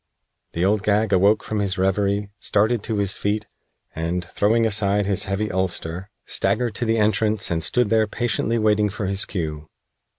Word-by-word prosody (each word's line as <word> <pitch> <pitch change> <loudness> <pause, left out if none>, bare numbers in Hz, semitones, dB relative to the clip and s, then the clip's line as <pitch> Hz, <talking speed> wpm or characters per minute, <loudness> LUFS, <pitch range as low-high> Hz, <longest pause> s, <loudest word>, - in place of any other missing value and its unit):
The 85 +2 0
Old 105 +1 +2
Gag 105 0 +1
awoke 100 +3 +3
from 110 - -3
his 100 -1 -1
reverie, 100 +2 0
started 110 +2 +1
to 110 0 -3
his 100 -2 -1
feet, 105 +1 -1 0.5
and, 85 +2 -3
throwing 110 +5 +1
aside 105 -1 +1
his 100 -1 0
heavy 100 +2 -2
ulster, 95 0 -3 0.2
staggered 120 -3 0
to 120 - -2
the 115 0 +1
entrance 105 -1 +1
and 80 -1 0
stood 110 - +1
there 110 -1 +3
patiently 115 +1 -1
waiting 105 -1 +2
for 105 +1 -4
his 100 0 0
cue. 75 -5 -5
100 Hz, 170 wpm, -22 LUFS, 95-110 Hz, 0.5 s, awoke